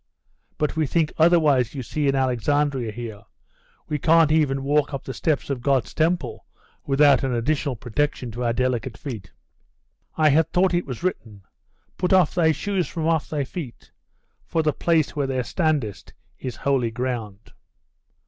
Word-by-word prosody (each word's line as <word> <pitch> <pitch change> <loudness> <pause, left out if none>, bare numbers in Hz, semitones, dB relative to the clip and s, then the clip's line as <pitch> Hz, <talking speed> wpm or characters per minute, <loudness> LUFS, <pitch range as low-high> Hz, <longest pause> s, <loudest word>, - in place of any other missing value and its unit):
'But 150 +1 -1
we 160 -2 +1
think 160 +1 0
otherwise, 150 -8 +4
you 130 - -4
see, 145 +5 -2
in 135 - +2
Alexandria 130 -1 0
here. 110 -2 -7 0.7
We 150 - -2
can't 165 0 +4
even 140 -4 +2
walk 145 0 +1
up 135 - -6
the 130 - -6
steps 145 +2 -1
of 130 -3 -3
God's 135 -2 +1
temple 160 -7 -1 0.4
without 140 -1 +5
an 130 -2 0
additional 140 +2 -1
protection 125 +2 -2
to 120 +3 -5
our 120 - +1
delicate 125 -1 -1
feet.' 115 -9 -7 0.9
'I 155 -1 +5
had 160 +3 +3
thought 180 +1 +2
it 175 0 0
was 130 +4 -6
written, 110 - -4 0.6
"Put 180 +1 +1
off 185 -5 +4
thy 165 -2 +3
shoes 190 0 -1
from 160 +1 -4
off 160 -2 +1
thy 150 -2 -1
feet, 135 -3 -8 0.5
for 160 - -1
the 150 -1 +1
place 160 -2 +1
where 140 -2 0
thou 130 -1 -1
standest 150 - -2 0.3
is 125 -2 -5
holy 135 -4 0
ground." 115 -4 -5
140 Hz, 165 wpm, -23 LUFS, 125-155 Hz, 0.9 s, without